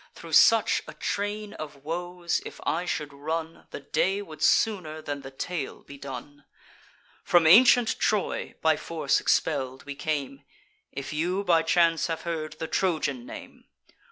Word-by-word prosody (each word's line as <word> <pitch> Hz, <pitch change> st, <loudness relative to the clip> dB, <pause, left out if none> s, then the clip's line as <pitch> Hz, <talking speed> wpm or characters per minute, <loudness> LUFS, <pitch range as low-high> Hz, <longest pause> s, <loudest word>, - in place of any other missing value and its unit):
Thro' -, -, -11 dB
such 225 Hz, -1 st, +5 dB
a -, -, -9 dB
train 205 Hz, +1 st, -3 dB
of 145 Hz, -3 st, -9 dB
woes 175 Hz, +1 st, -2 dB
if -, -, -9 dB
I 170 Hz, +3 st, -1 dB
should 150 Hz, -4 st, -3 dB
run, 160 Hz, +3 st, -5 dB
The -, -, -8 dB
day 190 Hz, +7 st, 0 dB
would 160 Hz, -5 st, -12 dB
sooner 180 Hz, -8 st, +2 dB
than 145 Hz, -2 st, -5 dB
the 135 Hz, -, -9 dB
tale 140 Hz, +2 st, -5 dB
be 140 Hz, -, -11 dB
done! 140 Hz, +1 st, -8 dB, 0.8 s
From 175 Hz, -2 st, +4 dB
ancient 235 Hz, +6 st, +6 dB
Troy, 210 Hz, -2 st, -1 dB
by 160 Hz, -1 st, +4 dB
force 155 Hz, -4 st, 0 dB
expell'd, 130 Hz, -4 st, 0 dB
we 145 Hz, -, -6 dB
came, 140 Hz, -2 st, -3 dB, 0.5 s
If 140 Hz, +2 st, -6 dB
you 180 Hz, +6 st, -1 dB
by 170 Hz, -4 st, +4 dB
chance 165 Hz, 0 st, +2 dB
have 165 Hz, -1 st, -3 dB
heard 160 Hz, -3 st, -4 dB
the 160 Hz, +1 st, -6 dB
Trojan 155 Hz, -9 st, -1 dB
name. -, -, -11 dB
160 Hz, 155 wpm, -27 LUFS, 145-180 Hz, 0.8 s, ancient